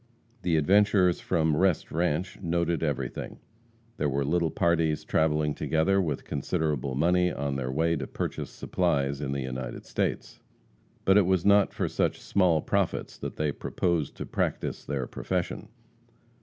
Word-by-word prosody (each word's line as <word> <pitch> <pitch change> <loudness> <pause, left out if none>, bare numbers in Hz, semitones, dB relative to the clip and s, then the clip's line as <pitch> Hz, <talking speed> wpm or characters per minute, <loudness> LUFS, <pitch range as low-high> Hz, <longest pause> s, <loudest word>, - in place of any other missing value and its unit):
The 85 -3 +1
adventurers 95 +2 +4
from 80 -3 +1
Rest 90 0 +1
Ranche 85 +2 -1
noted 85 -1 0
everything. 75 -5 -3 0.6
There 75 - 0
were 70 +1 0
little 85 +2 +1
parties 80 -2 +1
travelling 75 -1 +1
together 95 +7 +1
with 75 -6 -3
considerable 75 -3 -1
money, 90 +4 +3
on 70 -2 -2
their 65 -1 -2
way 80 +4 +1
to 65 -3 -4
purchase - - -4
supplies 70 -6 -1
in 70 -2 -2
the 70 0 -2
United 65 -1 -5
States. - - -2 0.7
But 95 +2 +6
it 95 - +2
was 95 -2 +2
not 100 0 +5
for - - -2
such - - 0
small 90 -5 +2
profits - - -1
that - - -5
they 75 -1 0
proposed 85 0 -1
to - - -5
practice - - -2
their 65 -3 -2
profession. - - -3
80 Hz, 150 wpm, -28 LUFS, 70-90 Hz, 0.7 s, But